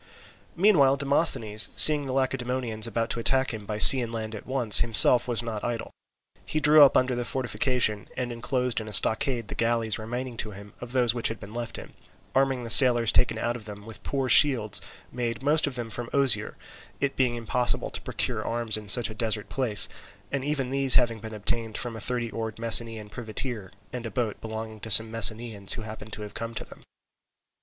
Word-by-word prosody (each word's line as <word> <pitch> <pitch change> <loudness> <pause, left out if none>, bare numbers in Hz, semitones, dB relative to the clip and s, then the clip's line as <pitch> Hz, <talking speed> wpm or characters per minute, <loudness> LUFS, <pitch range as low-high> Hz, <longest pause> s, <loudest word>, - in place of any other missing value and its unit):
Meanwhile 165 -8 +2
Demosthenes, 135 -7 -1
seeing 150 -2 +6
the - - -5
Lacedaemonians 125 -4 -3
about 115 0 -4
to - - -3
attack 130 +2 -1
him 105 -2 -10
by 105 - -5
sea 130 +4 +12
and 115 -1 -6
land 110 -1 -7
at 110 - -11
once, 125 -5 +4
himself 120 +1 +4
was 120 -1 -2
not 110 -3 -7
idle. 120 -1 -5 0.5
He 155 - -4
drew 150 +1 +4
up 140 - +5
under 130 0 0
the 120 0 -4
fortification 120 -3 -2
and 125 -1 -4
enclosed 125 0 -3
in 110 - -10
a 105 - -8
stockade 115 +1 +2
the - - -9
galleys 115 -1 -1
remaining 120 +2 -7
to 110 - -4
him 100 0 -13
of 125 0 -10
those 125 -3 +1
which 120 -2 -1
had 115 - -6
been 100 +2 -13
left 120 -1 -7
him, - - -12 0.4
arming 135 -2 -1
the 115 - -7
sailors 120 -2 +6
taken 115 -2 0
out 120 +1 -3
of 115 -4 -11
them 105 -1 -11
with 110 -1 -11
poor 135 -2 -4
shields 125 -6 +4 0.3
made 120 0 -5
most 150 +2 +1
of 140 - -5
them 120 -2 -6
of 120 -1 -7
osier, 140 -2 +1 0.4
it 140 -1 -3
being 125 -2 -1
impossible 120 +1 -2
to - - -6
procure - - -3
arms 115 -2 -3
in 105 -2 -11
such 115 +3 +5
a - - -9
desert 110 -2 -2
place, 120 -7 +1 0.4
and 140 -1 -4
even 140 -3 -4
these 135 -1 +3
having 120 -3 +1
been 110 0 -10
obtained 110 +1 -3
from 120 -2 -4
a - - -7
thirty 120 0 -5
oared 110 -1 -7
Messenian 115 -1 -1
privateer 110 -2 -6 0.2
and 120 -2 -6
a - - -7
boat 110 -1 -5
belonging 110 0 -8
to 110 - -9
some 110 +2 +3
Messenians 110 -3 +2
who 115 - -7
happened 110 0 -11
to 105 - -6
have 105 - -11
come 115 0 -8
to - - -6
them. - - -17
115 Hz, 205 wpm, -24 LUFS, 110-130 Hz, 0.5 s, sea